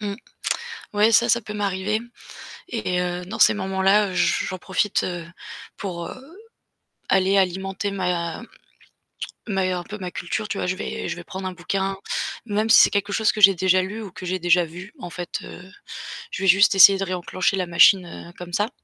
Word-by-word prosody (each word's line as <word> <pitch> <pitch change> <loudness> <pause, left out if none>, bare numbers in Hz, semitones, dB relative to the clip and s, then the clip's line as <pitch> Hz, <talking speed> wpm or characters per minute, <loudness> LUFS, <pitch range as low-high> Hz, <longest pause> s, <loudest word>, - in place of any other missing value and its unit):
Mmh. 205 -1 -3 0.8
Ouais, 210 +2 +3
ça, 235 +2 +4
ça 235 +1 +3
peut 210 -1 -8
m'arriver 205 +1 -1 0.7
et 185 -6 -2
heu, 180 0 -3
dans 185 - -7
ces - - +6
moments-là, 195 +1 +2
heu, - - -7
j 180 - +1
j'en 185 - -4
profite, 190 +3 -1
heu, 175 -2 -4 0.5
pour, 170 -4 -5
heu, 295 +8 -12 0.7
aller 195 +1 +3
alimenter 190 +1 -1
ma 180 -2 -2 1.1
ma 195 -3 -1 0.2
un 175 - -5
peu 210 +4 -8
ma 180 -3 -6
culture. 215 +6 -4
Tu 205 - -4
vois, - - -2
je 185 - -1
vais 190 - -5
je - - -3
vais 175 - -9
prendre 190 +2 -6
un - - -4
bouquin, 190 +2 -3 0.5
même 215 0 -1
si 225 - +8
c'est - - +7
quelque 200 0 -1
chose 220 +1 +2
que 215 - -5
j'ai 195 -1 +8
déjà 185 +1 +3
lu 205 +4 -5
ou 200 -4 -8
que 185 - -9
j'ai 185 +1 -2
déjà 175 0 +3
vu. 175 +5 -11
En 175 - -7
fait, 175 0 -7
heu, - - -10 0.7
je 190 - -5
vais - - +1
juste 195 +3 +6
essayer 195 +1 +9
de 195 - -2
réenclencher 185 +1 -1
la 185 -2 -2
machine, 180 +2 +5
heu, 170 0 -10
comme 175 0 -9
ça 205 +4 0
190 Hz, 200 wpm, -23 LUFS, 180-205 Hz, 1.1 s, essayer